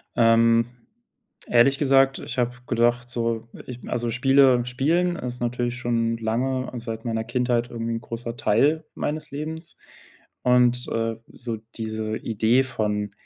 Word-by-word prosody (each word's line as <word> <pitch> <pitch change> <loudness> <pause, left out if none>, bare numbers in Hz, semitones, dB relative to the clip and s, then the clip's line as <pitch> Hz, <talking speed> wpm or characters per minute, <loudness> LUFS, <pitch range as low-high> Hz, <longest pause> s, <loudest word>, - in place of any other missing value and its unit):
Ähm, 115 0 +5 0.8
ehrlich 125 +3 +4
gesagt, 135 -1 +3
ich 130 - -6
habe 125 0 +1 0.2
gedacht, 120 0 +1
so, 115 -2 -2 0.2
ich 125 -1 -8
also 120 0 -2
Spiele 130 0 +4
spielen 165 +8 +1
ist 125 -5 -5
natürlich 120 0 -1
schon 115 -2 0
lange 130 +4 -1
seit 115 0 -6
meiner 115 -1 -1
Kindheit 120 -1 0
irgendwie 115 0 -3
'n 115 - -3
großer 115 0 -6
Teil 150 +9 +2
meines 150 0 -3
Lebens 160 +3 -6 0.7
und, 125 0 +3
äh, 115 0 -1
so 120 -2 -6 0.2
diese 110 -1 -3
Idee 115 +4 +2
von, 105 -5 -2
120 Hz, 135 wpm, -24 LUFS, 115-130 Hz, 0.8 s, Ähm